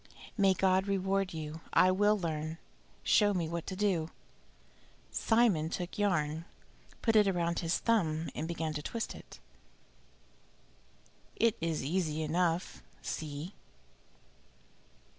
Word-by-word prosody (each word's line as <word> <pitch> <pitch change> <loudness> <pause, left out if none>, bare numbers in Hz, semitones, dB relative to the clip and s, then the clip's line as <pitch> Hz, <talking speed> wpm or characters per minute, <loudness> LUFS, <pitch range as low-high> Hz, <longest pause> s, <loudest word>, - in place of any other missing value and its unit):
"May 195 -3 +4
God 190 +1 +2
reward 195 -1 0
you! 155 0 -6
I 185 - +6
will 205 +3 +3
learn. 160 -3 -3 0.5
Show 205 -2 +4
me 170 -3 0
what 170 0 -4
to 190 - -4
do." 185 -5 +1 1.0
Simon 220 -9 +2
took 180 +3 -5
yarn, 160 -5 0 0.6
put 225 -2 +3
it 210 -2 +6
round 170 -2 0
his 165 0 0
thumb 165 -9 +1
and 160 - -3
began 165 -2 -2
to 150 - -4
twist 230 +9 -4
it. - - -12 2.0
"It 230 -1 +3
is 165 -3 -1
easy 160 0 -1
enough 170 +2 0 0.2
see!" 155 +4 -5
175 Hz, 120 wpm, -32 LUFS, 160-195 Hz, 2.0 s, I